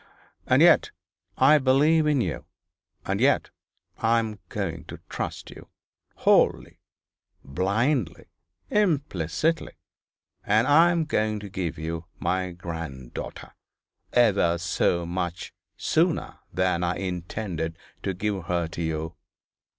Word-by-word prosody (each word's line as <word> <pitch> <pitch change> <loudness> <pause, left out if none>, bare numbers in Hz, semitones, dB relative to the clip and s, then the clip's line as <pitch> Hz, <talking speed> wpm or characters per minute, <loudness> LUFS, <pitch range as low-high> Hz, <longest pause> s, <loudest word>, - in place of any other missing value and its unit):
And - - +5
yet - - +6 0.5
I 150 +3 +6
believe 150 +4 +4
in 145 -4 +3
you 90 -8 -3 0.6
and - - -1
yet - - +3 0.5
I 115 +1 +3
am 110 -2 -2
going 85 -5 -4
to - - -9
trust - - -5
you, - - -12 0.5
wholly, - - +2 0.7
blindly, 100 - 0 0.5
implicitly 150 - 0 0.7
and 110 +3 +3
I 160 +5 +6
am 170 -2 +1
going 110 -7 0
to 100 - -8
give 90 -4 -3
you 80 +1 -4
my 90 +1 -1
granddaughter, 80 -7 -7 0.6
ever 100 -8 +3
so 85 0 0
much 90 0 -4 0.2
sooner - - 0
than 90 0 +1
I 90 0 0
intended 90 -2 -4 0.2
to 95 - -2
give 100 -2 -2
her 85 -2 0
to 85 - -6
you. 80 0 -3
95 Hz, 115 wpm, -26 LUFS, 85-115 Hz, 0.7 s, yet